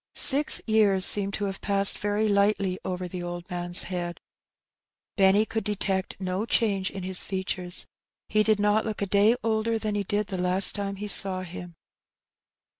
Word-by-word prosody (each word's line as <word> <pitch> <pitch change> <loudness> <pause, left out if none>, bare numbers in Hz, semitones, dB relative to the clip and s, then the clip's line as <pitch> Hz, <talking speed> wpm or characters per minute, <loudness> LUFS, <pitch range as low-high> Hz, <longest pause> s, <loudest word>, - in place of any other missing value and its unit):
Six 290 +2 +4
years 205 -4 +3
seemed 200 -1 +4
to 205 - -4
have 195 -1 -7
passed 200 0 +4
very 205 +1 -2
lightly 200 -2 -1
over 185 -1 -6
the 180 0 -8
old 175 0 -8
man's 175 0 +1
head. 175 -2 -6 1.0
Benny 195 +1 +2
could 220 0 -5
detect 195 -3 -4
no 190 +3 -5
change 200 -6 -1
in 195 -2 -9
his 185 0 +1
features; 185 -2 -3 0.4
he 215 - 0
did 215 -1 0
not 210 +1 0
look 215 -2 -5
a - - -1
day 205 +4 +1
older 225 0 -2
than 215 -1 -5
he 205 - -2
did 205 +2 -3
the 190 -1 -7
last 180 +2 +5
time 200 -1 -6
he 205 +2 -8
saw 190 -2 +5
him. 175 -1 -11
200 Hz, 175 wpm, -24 LUFS, 185-210 Hz, 1.0 s, last